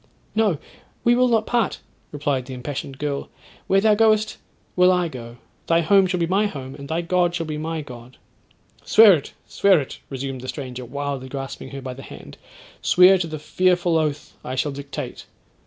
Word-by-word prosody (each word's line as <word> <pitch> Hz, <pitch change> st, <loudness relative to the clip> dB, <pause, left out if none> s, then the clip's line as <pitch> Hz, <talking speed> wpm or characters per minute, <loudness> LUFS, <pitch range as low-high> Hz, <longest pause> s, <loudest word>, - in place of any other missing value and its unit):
'—'No, 215 Hz, -7 st, +2 dB, 0.5 s
we 240 Hz, -, +5 dB
will 250 Hz, +1 st, +4 dB
not 225 Hz, -3 st, +2 dB
part,' 235 Hz, -5 st, 0 dB, 0.3 s
replied 140 Hz, -3 st, -2 dB
the 130 Hz, -, -6 dB
impassioned 135 Hz, +1 st, -6 dB
girl; 145 Hz, -1 st, -3 dB, 0.4 s
'where 195 Hz, +1 st, +3 dB
thou 215 Hz, 0 st, +4 dB
goest, 215 Hz, 0 st, +2 dB, 0.4 s
will 180 Hz, 0 st, +5 dB
I 180 Hz, -1 st, +1 dB
go; 120 Hz, -5 st, -9 dB, 0.3 s
thy 165 Hz, 0 st, +3 dB
home 195 Hz, +2 st, +4 dB
shall 180 Hz, -1 st, -1 dB
be 170 Hz, -, +2 dB
my 195 Hz, +5 st, +2 dB
home; 135 Hz, -8 st, -7 dB
and 140 Hz, 0 st, -9 dB
thy 165 Hz, +2 st, 0 dB
God 175 Hz, 0 st, +1 dB
shall 165 Hz, -1 st, -2 dB
be 155 Hz, -1 st, -4 dB
my 160 Hz, 0 st, -3 dB
God.'—'Swear 130 Hz, -, +1 dB
it, 150 Hz, -5 st, -3 dB
swear 200 Hz, -4 st, +3 dB
it,' 135 Hz, -, -7 dB
resumed 135 Hz, -1 st, -5 dB
the 130 Hz, -, -8 dB
stranger, 130 Hz, -3 st, -6 dB
wildly 140 Hz, 0 st, -4 dB
grasping 135 Hz, 0 st, -6 dB
her 135 Hz, -1 st, -8 dB
by 130 Hz, -1 st, -5 dB
the 135 Hz, -, -10 dB
hand; -, -, -12 dB, 0.4 s
'swear 185 Hz, +1 st, +6 dB
to 170 Hz, -, -2 dB
the 155 Hz, -1 st, -5 dB
fearful 175 Hz, +2 st, +1 dB
oath 150 Hz, -2 st, -1 dB
I 130 Hz, -, -4 dB
shall 140 Hz, +3 st, 0 dB
dictate.' 140 Hz, 0 st, -7 dB
155 Hz, 185 wpm, -22 LUFS, 135-185 Hz, 0.5 s, swear